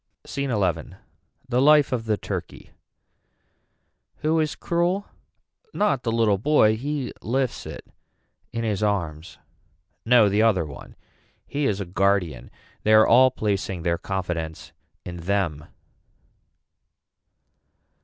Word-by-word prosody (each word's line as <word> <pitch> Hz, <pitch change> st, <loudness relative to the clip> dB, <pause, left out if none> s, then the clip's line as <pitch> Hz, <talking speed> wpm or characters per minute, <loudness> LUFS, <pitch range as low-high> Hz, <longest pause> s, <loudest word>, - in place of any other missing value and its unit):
SCENE 140 Hz, 0 st, -3 dB
XI. 90 Hz, -6 st, -1 dB, 0.5 s
The 125 Hz, 0 st, +1 dB
life 150 Hz, 0 st, +5 dB
of 120 Hz, -3 st, -2 dB
the 110 Hz, -2 st, 0 dB
turkey. -, -, -6 dB, 1.5 s
Who 160 Hz, +1 st, +2 dB
is 155 Hz, -1 st, -1 dB
cruel. 175 Hz, +4 st, 0 dB, 0.7 s
Not 140 Hz, -11 st, +1 dB
the 115 Hz, -, -2 dB
little 110 Hz, -4 st, +2 dB
boy 110 Hz, -4 st, +4 dB
he 140 Hz, +2 st, -4 dB
lifts 130 Hz, +2 st, -2 dB
it -, -, -9 dB, 0.7 s
in 115 Hz, 0 st, -3 dB
his 105 Hz, -3 st, -1 dB
arms. 85 Hz, -6 st, -2 dB, 0.7 s
No 115 Hz, -2 st, +5 dB
the 100 Hz, +2 st, +2 dB
other 105 Hz, -7 st, +3 dB
one. 70 Hz, -2 st, -11 dB, 0.5 s
He 145 Hz, 0 st, -1 dB
is 100 Hz, -4 st, -1 dB
a 100 Hz, -, -3 dB
guardian. 95 Hz, -1 st, 0 dB, 0.3 s
They 110 Hz, -, +2 dB
are 110 Hz, 0 st, +7 dB
all 130 Hz, +2 st, +6 dB
placing 100 Hz, -7 st, -2 dB
their 85 Hz, -1 st, 0 dB
confidence 85 Hz, -4 st, -4 dB, 0.3 s
in 90 Hz, -1 st, -6 dB
them. 85 Hz, -4 st, -1 dB
110 Hz, 120 wpm, -24 LUFS, 95-130 Hz, 1.5 s, are